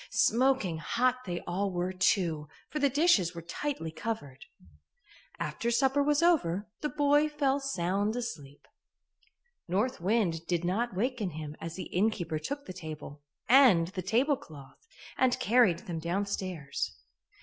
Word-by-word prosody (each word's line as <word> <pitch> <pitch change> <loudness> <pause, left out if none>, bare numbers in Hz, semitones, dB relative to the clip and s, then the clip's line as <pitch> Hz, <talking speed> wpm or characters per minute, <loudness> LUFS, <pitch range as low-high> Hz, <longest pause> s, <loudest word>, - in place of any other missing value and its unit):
Smoking 235 -9 +2
hot 250 +9 0
they 175 -1 -3
all 195 +3 -2
were, 180 0 -2
too, 170 -5 +1 0.2
for 305 - -2
the 280 - +3
dishes 255 - +3
were 170 - -6
tightly 175 - -4
covered. 160 -9 -5 0.9
After 155 +10 -2
supper 270 +4 +3
was 295 +2 +2
over, 210 - +2
the 300 - -2
boy 290 +1 +3
fell 285 -2 +1
sound 205 -4 -1
asleep. 150 - -6 1.0
North 205 +6 0
Wind 180 -5 0
did 175 -1 0
not 205 +4 -1
waken 230 -1 -1
him 150 -1 -6
as 165 0 -5
the 185 - -5
innkeeper 180 -5 0
took 285 - -5
the 185 - -7
table 155 -4 -8 0.3
and 235 -10 +6
the 190 -1 -5
tablecloth 220 - -2 0.3
and 255 -1 +3
carried 225 -5 +4
them 170 -2 -4
downstairs. 180 -4 -3
200 Hz, 140 wpm, -30 LUFS, 170-255 Hz, 1.0 s, and